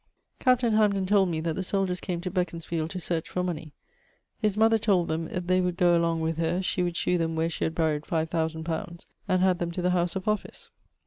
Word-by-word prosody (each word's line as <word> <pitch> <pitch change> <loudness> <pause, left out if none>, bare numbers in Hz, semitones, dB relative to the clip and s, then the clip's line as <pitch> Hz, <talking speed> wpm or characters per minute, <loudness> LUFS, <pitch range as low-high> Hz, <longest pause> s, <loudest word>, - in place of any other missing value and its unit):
Captain 250 -3 +3
Hamden 205 -3 +3
told 195 -1 +3
me 160 -2 -1
that 165 0 -1
the 190 - -3
soldiers 185 -1 -1
came 175 -2 -3
to 180 0 -4
Beconsfield 165 -3 -2
to 185 - -5
search 165 -2 -2
for 180 - -2
money; 165 -4 -4 0.7
his 210 -3 0
mother 225 +1 +4
told 190 -5 +2
them 160 +1 -1
if 180 +1 -4
they 185 +1 +3
would 180 -1 -1
goe 175 -2 +4
along 165 -1 +1
with 160 0 -1
her, 165 +2 0
she 185 0 0
would 175 -1 -1
shew 180 -1 +1
them 165 -1 -1
where 165 +1 0
she - - -2
had 160 - -2
buried 155 -2 0
five 160 -1 0
thousands 160 -1 -1
pounds, 170 +1 -5 0.2
and 185 0 +2
had 185 -2 +3
them 175 - -1
to 180 - -4
the 180 - +2
house 175 0 0
of 190 +1 -4
office. 215 -1 -3
175 Hz, 240 wpm, -27 LUFS, 165-185 Hz, 0.7 s, mother